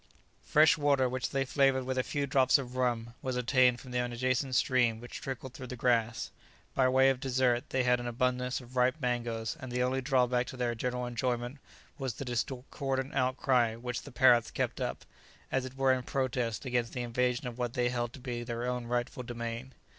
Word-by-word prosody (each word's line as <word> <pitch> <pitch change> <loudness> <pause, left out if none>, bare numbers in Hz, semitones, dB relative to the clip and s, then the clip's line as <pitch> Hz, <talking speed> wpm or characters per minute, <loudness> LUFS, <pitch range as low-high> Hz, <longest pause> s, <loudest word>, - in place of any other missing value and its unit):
Fresh 155 +1 +5
water, 140 -3 +3
which 130 0 -2
they 135 0 0
flavoured 135 -1 +2
with 130 0 -2
a 130 - +2
few 145 +2 -2
drops 130 -1 +4
of 125 -2 -6
rum, 120 -2 0
was 130 -1 -2
obtained 125 0 +3
from 125 - -10
an 125 0 0
adjacent 130 +2 0
stream 120 -4 +3
which 120 +1 -8
trickled 130 -1 -6
through 130 -1 -8
the 125 - -6
grass. 115 -2 +1 0.4
By 130 -1 +3
way 130 +1 +5
of 130 - -3
dessert 130 -2 +1
they 130 -1 +1
had 125 0 +3
an 120 - -4
abundance 125 +1 0
of 125 +1 -14
ripe 125 +1 +3
mangoes, 120 -3 -2
and 130 -3 -7
the 125 0 +1
only 130 +1 0
drawback 125 -2 +2
to 130 - -8
their 120 -1 0
general 125 +2 -2
enjoyment 120 +2 -2 0.4
was 130 -5 -3
the 135 - -6
discordant 130 +2 -2
outcry 130 -3 +2
which 125 +1 -4
the 145 - -11
parrots 120 -1 +5
kept - - -2
up, - - -3 0.5
as 130 -1 0
it 130 +1 -9
were 135 -1 +4
in 130 - -1
protest 125 -2 -2
against 120 -2 -1
the 125 - -2
invasion 125 +1 0
of 125 0 -6
what 120 -1 -1
they 125 -2 +1
held 120 -1 -2
to - - -10
be 125 -2 -4
their 120 0 -4
own 125 -1 -2
rightful 120 +1 -2
domain. 120 +1 -5
125 Hz, 205 wpm, -31 LUFS, 120-130 Hz, 0.5 s, Fresh